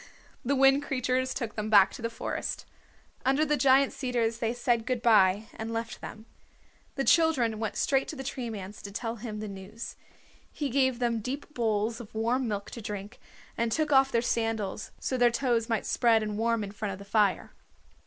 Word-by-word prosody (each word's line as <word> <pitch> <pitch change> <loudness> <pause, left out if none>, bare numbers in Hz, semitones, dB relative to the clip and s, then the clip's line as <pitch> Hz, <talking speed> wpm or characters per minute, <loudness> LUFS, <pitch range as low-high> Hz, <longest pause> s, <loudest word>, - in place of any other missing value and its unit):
The 280 +3 +1
Wind 270 +1 +5
Creatures 260 -2 -1
took 230 -5 -4
them 215 0 -3
back 200 -3 +6
to - - -8
the 230 - -1
forest. 230 - -4 0.6
Under 270 +4 +3
the 300 0 +2
giant 275 -1 +4
cedars 235 -3 -1
they 230 -1 0
said 240 -1 0
good 250 -2 -1
by 210 -2 +5
and 220 +1 -5
left 230 0 -4
them. 220 +1 -9 0.7
The 275 - 0
children 270 -10 +3
went 220 -2 -3
straight 270 -1 +1
to - - -6
the 270 - -6
Tree 255 -3 -4
Man's 205 -2 -7
to 200 - -8
tell 225 +2 -4
him 215 -2 -6
the 215 - -5
news. 200 +3 -8 0.6
He 290 -2 -3
gave 260 -1 +2
them 235 -2 0
deep 275 +6 -5
bowls 225 -1 0
of 220 -1 -13
warm 240 +3 0
milk 205 -2 -4
to 235 - -7
drink, 205 +1 -6 0.4
and 230 0 0
took 305 +5 0
off 270 -1 +5
their 235 0 +1
sandals 225 -4 -1
so 260 - -2
that - - -5
their 245 0 +6
toes 235 -1 0
might 225 -2 0
spread 230 -3 +3
and 210 -1 -3
warm 230 0 +1
in 200 - -6
front 205 -1 -4
of - - -7
the 200 - -11
fire. 205 -1 +1
230 Hz, 205 wpm, -28 LUFS, 215-260 Hz, 0.7 s, back